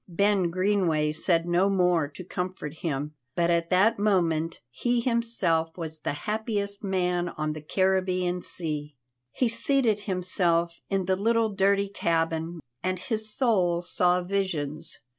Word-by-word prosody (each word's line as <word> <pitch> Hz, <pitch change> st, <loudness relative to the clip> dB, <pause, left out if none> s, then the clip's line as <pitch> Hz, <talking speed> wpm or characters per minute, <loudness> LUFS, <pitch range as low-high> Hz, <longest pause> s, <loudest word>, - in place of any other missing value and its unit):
Ben 195 Hz, 0 st, +2 dB
Greenway 180 Hz, -5 st, +1 dB
said 165 Hz, +2 st, +2 dB
no 175 Hz, +3 st, +3 dB
more 180 Hz, -5 st, +2 dB
to 150 Hz, +6 st, -10 dB
comfort 180 Hz, -4 st, -4 dB
him, 150 Hz, -2 st, -3 dB, 0.2 s
but 170 Hz, 0 st, +2 dB
at 170 Hz, 0 st, +1 dB
that 200 Hz, +4 st, +3 dB
moment 170 Hz, -5 st, +1 dB
he 240 Hz, -, 0 dB
himself 225 Hz, -10 st, 0 dB
was 160 Hz, -2 st, -5 dB
the -, -, -2 dB
happiest 210 Hz, -2 st, -2 dB
man 180 Hz, -2 st, 0 dB
on 155 Hz, -1 st, -3 dB
the 155 Hz, -, -7 dB
Caribbean 185 Hz, +1 st, 0 dB
Sea. 150 Hz, -4 st, -1 dB, 0.4 s
He 255 Hz, -, +1 dB
seated 230 Hz, -1 st, +1 dB
himself 175 Hz, -3 st, 0 dB
in 195 Hz, -2 st, 0 dB
the 190 Hz, +1 st, +2 dB
little 225 Hz, +3 st, +2 dB
dirty 200 Hz, 0 st, +2 dB
cabin, 165 Hz, -3 st, -1 dB, 0.2 s
and 185 Hz, +1 st, -1 dB
his 215 Hz, +4 st, -2 dB
soul 185 Hz, -9 st, +1 dB
saw 180 Hz, 0 st, +2 dB
visions. 165 Hz, -5 st, -3 dB
180 Hz, 140 wpm, -27 LUFS, 165-200 Hz, 0.4 s, no